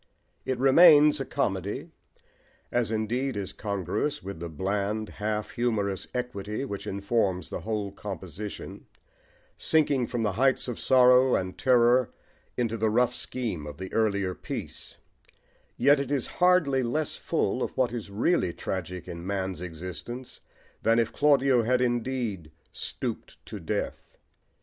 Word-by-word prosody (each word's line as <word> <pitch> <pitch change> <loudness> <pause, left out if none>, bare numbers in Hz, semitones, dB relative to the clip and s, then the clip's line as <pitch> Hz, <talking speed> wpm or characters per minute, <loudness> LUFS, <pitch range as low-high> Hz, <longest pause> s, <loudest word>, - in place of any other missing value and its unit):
It 130 - -1
remains 150 +2 +7
a 135 - -2
comedy, 95 - -2 0.8
as 120 -2 +1
indeed 115 +3 -1
is 100 -2 -4
congruous 100 - -2
with 100 -2 -6
the 85 0 -5
bland, 100 +6 -2
half 105 0 -3
humorous 105 -6 -1
equity 125 -1 -3
which 100 -6 -6
informs 100 - 0
the - - -4
whole 105 -3 -3
composition, 100 0 -7 0.7
sinking 145 -6 +2
from 120 -2 -2
the 105 - +1
heights 130 +7 +2
of 125 - -4
sorrow 125 0 +5
and 95 0 -2
terror 125 -1 +4 0.5
into 115 -2 0
the 110 0 +1
rough 120 +2 +2
scheme 105 -12 -4
of 75 -1 -8
the 95 0 -7
earlier 100 -4 +1
piece; - - -7 0.8
yet 140 +4 +5
it 140 0 -3
is 140 -4 +1 0.2
hardly 180 -7 +4
less 145 +5 -1
full - - -1
of - - 0
what 130 -3 +2
is 115 -4 -5
really 105 - +1
tragic 90 0 -5
in 85 0 -7
man's 95 -2 -2
existence 90 +9 -7 0.4
than 115 +1 +3
if 115 -1 +1
Claudio 135 -4 +4
had 125 +2 +2
indeed 120 -8 -1 0.2
"stooped - - -5
to - - -7
death." - - -4
115 Hz, 140 wpm, -27 LUFS, 100-130 Hz, 0.8 s, remains